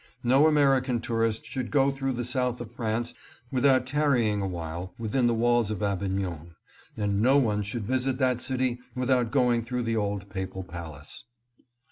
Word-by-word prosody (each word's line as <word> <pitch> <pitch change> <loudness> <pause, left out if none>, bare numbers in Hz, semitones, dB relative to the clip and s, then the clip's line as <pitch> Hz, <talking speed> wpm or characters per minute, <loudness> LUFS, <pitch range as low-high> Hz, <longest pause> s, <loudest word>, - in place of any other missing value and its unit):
No 135 +5 +5
American 135 -5 +3
tourist 115 -1 -1
should 130 -3 -4
go 140 -1 +3
through 135 -1 -2
the 120 0 -3
south 125 -1 0
of 120 -2 -7
France 120 0 -2 0.4
without 130 -1 +3
tarrying 125 -7 +1
awhile 85 -1 -5
within 115 +2 +1
the 120 - +2
walls 120 -1 +2
of 105 -1 -3
Avignon, 95 -4 -2 0.4
and 100 -1 0
no 130 +5 +5
one 105 -6 +2
should 105 +2 -4
visit 130 +2 +1
that 130 -2 +1
city 130 -2 0 0.2
without 125 -2 +1
going 120 0 +2
through 125 +1 -3
the 115 -1 -1
old 100 -1 -2
papal 95 -1 -5
palace. 80 -5 -8
120 Hz, 160 wpm, -27 LUFS, 100-130 Hz, 0.4 s, No